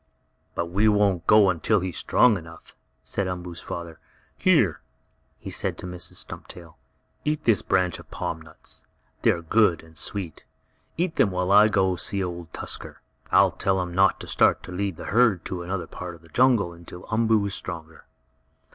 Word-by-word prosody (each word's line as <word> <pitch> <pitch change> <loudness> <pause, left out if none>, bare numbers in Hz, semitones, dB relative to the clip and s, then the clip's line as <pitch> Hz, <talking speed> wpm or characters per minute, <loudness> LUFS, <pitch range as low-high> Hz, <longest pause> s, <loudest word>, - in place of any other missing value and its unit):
"But 85 - -1
we 105 +4 +3
won't 100 -5 +2
go 105 -2 +6
until 100 +5 +1
he 95 - -2
is 85 - -7
strong 125 -4 +4
enough," 85 -3 -11 0.3
said 100 -2 -1
Umboo's 90 -1 -6
father. 85 -2 -7 0.4
"Here," - - +3 0.6
he - - -8
said - - -2
to - - -8
Mrs. 90 -1 -5
Stumptail, 85 -3 -7 0.5
"eat 150 0 -1
this 115 -4 +3
branch 90 -2 0
of - - -14
palm 85 -2 -4
nuts. 80 -1 -9 0.3
They - - +4
are 85 - +1
good 90 -2 +3
and 80 0 -18
sweet. 95 -4 -3 0.5
Eat 170 0 -1
them 105 - +4
while 90 0 -1
I 105 +2 +8
go 95 -3 +2
and 90 - -3
see 100 -1 -1
Old 85 -2 -6
Tusker. - - -5 0.3
I'll - - +5
tell 95 -1 0
him 90 -1 -3
not 95 +1 +3
to - - -6
start - - +3
to - - -9
lead 95 0 -2
the - - -8
herd 110 -5 +3
to 90 -2 -4
another 90 +1 -3
part 90 -2 -8
of 85 - -19
the 80 - -18
jungle 120 -8 +3
until 85 +1 -11
Umboo 110 -2 +2
is 100 - -3
stronger." 80 -3 -7
90 Hz, 185 wpm, -25 LUFS, 85-105 Hz, 0.6 s, I